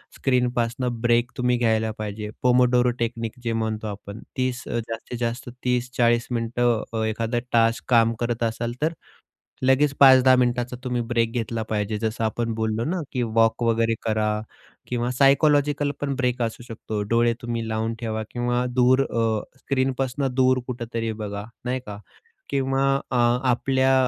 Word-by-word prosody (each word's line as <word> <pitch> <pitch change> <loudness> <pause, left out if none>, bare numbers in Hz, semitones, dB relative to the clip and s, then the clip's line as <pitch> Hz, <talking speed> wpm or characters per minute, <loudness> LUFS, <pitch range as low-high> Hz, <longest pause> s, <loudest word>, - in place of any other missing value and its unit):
स्क्रीनपासनं 125 -1 0
break 120 +1 +2
तुम्ही 125 0 +2
घ्यायला 110 -2 +1
पाहिजे. 105 0 -5
पोमोडोरो 125 0 +4
टेक्निक 115 0 -3
जे 115 -1 -1
म्हणतो 110 -1 -2
आपण, 100 +1 -7 0.2
30, 130 -1 -1
अ, 120 - -1
जास्तीत 115 +2 -5
जास्त 120 +1 -3
30-40 120 -1 +1
मिनिटं 120 0 +1
अ, 110 -1 -1
एखादा 115 +2 -1
टास्क 115 0 +2
काम 115 -2 +4
करत 120 0 -1
असाल, 115 +1 -2
तर 160 +2 +1 0.7
लगेच 135 +2 +4
5-10 130 -1 +8
मिनिटाचा 125 0 0
तुम्ही 125 -2 -1
ब्रेक 115 -1 +1
घेतला 115 -1 -2
पाहिजे. 105 0 -1
जसं 110 0 -2
आपण 115 +1 -1
बोललो 110 0 -1
ना, 180 +2 -1
की 125 - -1
वॉक 115 +1 +2
वगैरे 115 0 +2
करा 110 -1 0 0.5
किंवा 120 0 -1
सायकॉलॉजिकल 145 +2 +3
पण 140 -1 -1
ब्रेक 125 -1 0
असू 115 +1 -3
शकतो. 110 -2 -5
डोळे 115 0 +3
तुम्ही 115 -1 -3
लावून 110 +1 -1
ठेवा 110 -2 -3
किंवा 120 0 0
दूर 130 +1 +4
अ, 115 -4 0 0.2
स्क्रीनपासनं 130 0 -1
दूर 130 0 +4
कुठेतरी 115 -2 -3
बघा, 100 0 -5 0.2
नाही 125 +1 -1
का? 105 -1 -7 0.5
किंवा 135 0 +1 0.3
अ, 125 - +1 0.3
आपल्या 130 +2 +2
120 Hz, 150 wpm, -24 LUFS, 115-125 Hz, 0.7 s, 5-10